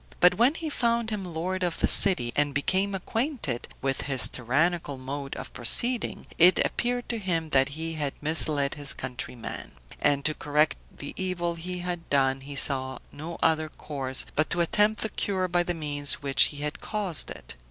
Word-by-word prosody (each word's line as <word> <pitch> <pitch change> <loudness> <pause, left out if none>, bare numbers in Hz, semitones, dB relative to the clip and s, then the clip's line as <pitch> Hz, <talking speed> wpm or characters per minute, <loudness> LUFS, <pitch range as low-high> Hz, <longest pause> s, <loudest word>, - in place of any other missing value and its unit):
But 180 0 +6
when 240 - +3
he 330 - -4
found 235 -3 +1
him 210 -2 -3
lord 180 +2 -3
of 175 -2 -1
the - - +2
city, 125 - +5
and 145 -1 +2
became 190 +7 +1
acquainted 225 - -2 0.2
with 135 -1 0
his 135 -2 +1
tyrannical 145 +4 0
mode 135 +2 -5
of - - -7
proceeding, 235 - +2
it 180 +2 +7
appeared 245 0 -1
to 235 - -1
him 165 -5 -2
that 135 +1 +4
he 165 0 -3
had 145 -3 -3
misled 150 -2 +2
his 145 -2 +1
countrymen; 125 -2 -6 0.3
and 140 -1 +2
to 155 - +3
correct 150 +1 +1
the 145 - -8
evil 180 -2 -1
he 180 +2 -5
had 175 -2 -4
done, 135 -1 +2
he 140 +1 -8
saw 130 -2 0
no 160 +3 -7
other 155 -1 +2
course, 135 -4 -3
but 155 - +1
to 175 - +2
attempt 210 +5 +2
the 220 - -1
cure 190 -3 -1
by 175 0 +1
the 175 0 -2
means 145 -2 -2
which 140 -1 +4
had 150 0 -5
caused 205 -6 -2
it. - - -8
160 Hz, 180 wpm, -27 LUFS, 140-185 Hz, 0.3 s, it